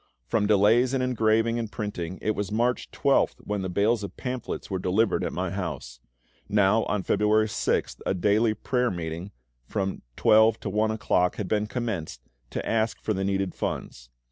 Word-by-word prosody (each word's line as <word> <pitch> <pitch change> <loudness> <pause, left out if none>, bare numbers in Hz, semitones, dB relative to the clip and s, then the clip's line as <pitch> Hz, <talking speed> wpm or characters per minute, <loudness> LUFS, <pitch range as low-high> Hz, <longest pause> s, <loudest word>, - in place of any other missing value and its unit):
From 105 -2 +1
delays 110 +5 +4
in 130 - 0
engraving 115 -1 +2
and 115 -2 -4
printing, 95 -4 -4
it 110 - +2
was 105 -2 -3
March 120 +3 0
12th - - +2
when 105 -1 -2
the 95 - -3
bales 105 +4 +1
of 100 - -7
pamphlets 125 -2 -4
were 95 -2 -2
delivered 100 +5 +1
at - - -2
my - - -2
house. - - -5 0.5
Now 105 +2 +3
on 105 -2 -1
February 105 +2 +3
6th 105 - -1
a - - 0
daily 105 +4 +2
prayer 125 +3 0
meeting, 85 0 -5 0.4
from 95 -2 -2
12 110 +1 +5
to - - -3
1 110 +2 +1
o'clock, 90 -4 +1
had 105 - -4
been 105 +1 0
commenced, 105 - -4 0.3
to - - -4
ask 110 0 0
for 110 - -1
the 95 -1 -2
needed 95 -1 -1
funds. - - -5
105 Hz, 175 wpm, -26 LUFS, 95-115 Hz, 0.5 s, 12